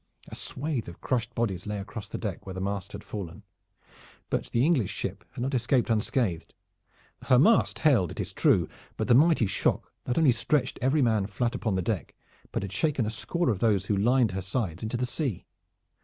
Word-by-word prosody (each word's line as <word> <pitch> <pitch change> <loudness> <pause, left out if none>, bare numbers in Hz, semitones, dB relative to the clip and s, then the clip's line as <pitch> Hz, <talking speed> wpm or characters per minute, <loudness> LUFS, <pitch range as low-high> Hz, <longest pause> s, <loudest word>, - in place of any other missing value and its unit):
A - - -11
swath 140 -5 -3
of 85 - -9
crushed 120 -2 -2
bodies 105 -6 -1
lay 105 0 -2
across 100 +1 -7
the - - -5
deck 105 -6 -4
where 95 - -6
the - - -4
mast 100 0 -3
had - - -7
fallen. 100 -1 -7 0.9
But - - 0
the 120 +3 +2
English 145 - +2
ship - - -4
had 120 - -4
not 135 +2 -2
escaped 125 -1 +2
unscathed. 110 -5 0 0.7
Her 125 - +5
mast 215 - +4
held, 125 - +3
it - - -8
is - - -4
true, - - +3 0.3
but - - -1
the - - +5
mighty 150 -1 +5
shock 95 - -1
not 125 - 0
only 160 -5 +5
stretched 135 +4 0
every 135 +3 +3
man 110 -5 +2
flat 120 +4 -1
upon 110 -6 -1
the 95 - 0
deck, 95 -6 -3 0.4
but - - -2
had 100 - -5
shaken 135 +4 +1
a 105 - -2
score 170 +6 0
of 100 - -2
those 100 -4 +2
who 105 - +1
lined 120 +3 +3
her 95 +1 -3
sides 95 -3 -2
into 110 +2 -2
the 125 - 0
sea. 125 - -2
115 Hz, 205 wpm, -28 LUFS, 100-130 Hz, 0.9 s, Her